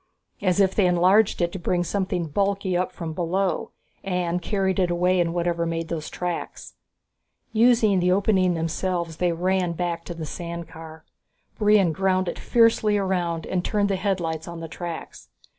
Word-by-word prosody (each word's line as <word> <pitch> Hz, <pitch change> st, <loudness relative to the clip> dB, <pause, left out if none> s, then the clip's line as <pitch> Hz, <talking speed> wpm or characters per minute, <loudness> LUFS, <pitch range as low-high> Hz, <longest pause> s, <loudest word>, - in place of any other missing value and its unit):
"As 185 Hz, -1 st, +1 dB
if 190 Hz, -1 st, +4 dB
they 200 Hz, -, +3 dB
had 180 Hz, 0 st, +3 dB
enlarged 190 Hz, +2 st, +4 dB
it 170 Hz, -, 0 dB
to 190 Hz, -, -6 dB
bring 175 Hz, +1 st, 0 dB
something 185 Hz, -2 st, -1 dB
bulky 195 Hz, +3 st, 0 dB
up 180 Hz, +1 st, 0 dB
from 165 Hz, -3 st, -6 dB
below 180 Hz, +1 st, -1 dB, 0.3 s
and 180 Hz, -2 st, -1 dB
carried 190 Hz, -1 st, 0 dB
it 180 Hz, -2 st, +2 dB
away 180 Hz, +1 st, +2 dB
in 170 Hz, -1 st, +1 dB
whatever 170 Hz, 0 st, -1 dB
made 165 Hz, 0 st, -3 dB
those 160 Hz, -2 st, -4 dB
tracks!" 175 Hz, -1 st, -5 dB, 0.8 s
Using 225 Hz, -3 st, +4 dB
the 180 Hz, 0 st, +2 dB
opening 185 Hz, -2 st, +2 dB
themselves, 170 Hz, 0 st, -2 dB
they 180 Hz, -1 st, +1 dB
ran 180 Hz, +1 st, 0 dB
back 170 Hz, 0 st, -3 dB
to 175 Hz, -, -6 dB
the 160 Hz, -1 st, -5 dB
sand 170 Hz, +1 st, -6 dB
car. 160 Hz, -1 st, -11 dB, 0.5 s
Brion 205 Hz, -5 st, +4 dB
ground 185 Hz, +1 st, +1 dB
it -, -, -4 dB
fiercely 225 Hz, -3 st, +3 dB
around 180 Hz, -4 st, -1 dB
and 180 Hz, -1 st, -1 dB
turned 205 Hz, 0 st, 0 dB
the 195 Hz, -, +1 dB
headlights 175 Hz, -5 st, -2 dB
on 170 Hz, -1 st, -7 dB
the 165 Hz, -, -6 dB
tracks. 170 Hz, 0 st, -7 dB
180 Hz, 175 wpm, -24 LUFS, 170-195 Hz, 0.8 s, if